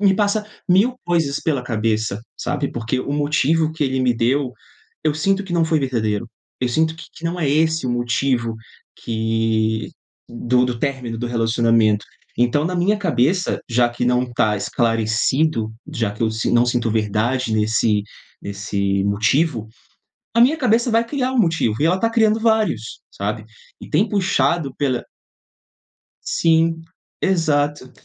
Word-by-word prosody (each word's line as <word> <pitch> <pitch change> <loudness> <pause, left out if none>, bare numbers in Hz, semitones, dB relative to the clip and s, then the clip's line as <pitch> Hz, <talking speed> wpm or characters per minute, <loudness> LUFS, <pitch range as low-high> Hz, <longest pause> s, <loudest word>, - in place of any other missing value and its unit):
me 200 -2 +5
passa 205 +1 +1 0.2
1000 215 +8 +3
coisas 160 -5 +1
pela 140 -6 -1
cabeça, 110 -2 -1 0.2
sabe? 145 -1 -2
Porque 120 +2 -2
o 140 - -4
motivo 155 +2 +1
que 155 -2 -1
ele 130 0 0
me 125 -1 +3
deu, 130 +3 +1 0.5
eu 155 - +2
sinto 195 +6 0
que 185 - -7
não 170 -1 +3
foi 160 -1 +1
verdadeiro, 115 -4 -1 0.3
eu 125 - +1
sinto 160 +5 +1
que 165 - -10
que 165 - -12
não 170 +2 -2
é 145 - +1
esse 160 0 +1
o - - -1
motivo 120 -1 0 0.4
que 110 -1 -1 0.4
do 125 +1 +1
do 120 -2 -3
término 130 -5 -2
do 120 - -3
relacionamento. 115 -2 +2 0.3
Então, 120 +5 +2
na 180 +2 -2
minha 190 +4 +2
cabeça, 180 0 +1
já 120 +1 +3
que 120 +1 -3
não 125 0 +1
tá 105 -3 +1
esclarecido, 115 +3 0 0.2
já 115 -3 -1
que 105 - -15
eu 110 - +3
si 110 0 -2
não 120 +1 +4
sinto 120 -2 0
verdade 110 +3 0
nesse 110 -1 +2 0.4
nesse 100 -1 -1
motivo, 110 +3 +1 0.7
a 235 - +4
minha 275 +7 +5
cabeça 240 -3 +2
vai 230 +1 +3
criar 260 -1 -1
um 260 - -1
motivo 165 - +2
e - - +3
ela 180 +3 +2
tá 230 - +2
criando 220 -1 +3
vários, 215 - 0
sabe? 105 +2 -4 0.4
E - - -11
tem 215 - +2
puxado 170 -7 +1
pela 130 -4 0 1.3
Sim, 165 0 +2 0.4
exato, 145 -7 0
130 Hz, 155 wpm, -20 LUFS, 115-165 Hz, 1.3 s, me